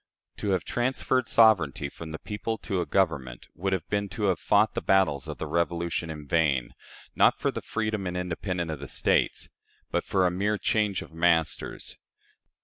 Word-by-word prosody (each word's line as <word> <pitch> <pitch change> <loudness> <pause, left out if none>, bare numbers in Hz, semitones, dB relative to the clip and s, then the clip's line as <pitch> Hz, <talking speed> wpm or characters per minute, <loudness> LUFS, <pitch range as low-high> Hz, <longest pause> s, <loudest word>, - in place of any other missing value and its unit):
To 105 - -2
have 95 -3 +1
transferred 130 0 0
sovereignty 90 - +4
from 80 +3 -9
the 80 - -5
people 110 +4 -4
to 95 -5 -2
a 85 - -4
Government 70 -9 0
would 95 +4 -2
have 95 -4 -1
been 100 -1 -1
to 110 - -2
have 95 -3 +2
fought 105 +1 +3
the - - -2
battles 95 -8 +2
of - - -5
the - - -4
Revolution 85 +1 -1
in 75 -2 -7
vain 70 -6 +1 0.4
not - - +5
for - - +1
the - - -5
freedom 110 -3 -2
and 90 0 -3
independence 90 -1 -3
of 75 - -5
the 70 - -7
States, - - +1 0.4
but - - 0
for 95 -2 +1
a 90 - +2
mere 105 +4 0
change 105 -2 0
of - - -15
masters. 80 -1 0
90 Hz, 185 wpm, -27 LUFS, 80-105 Hz, 0.4 s, not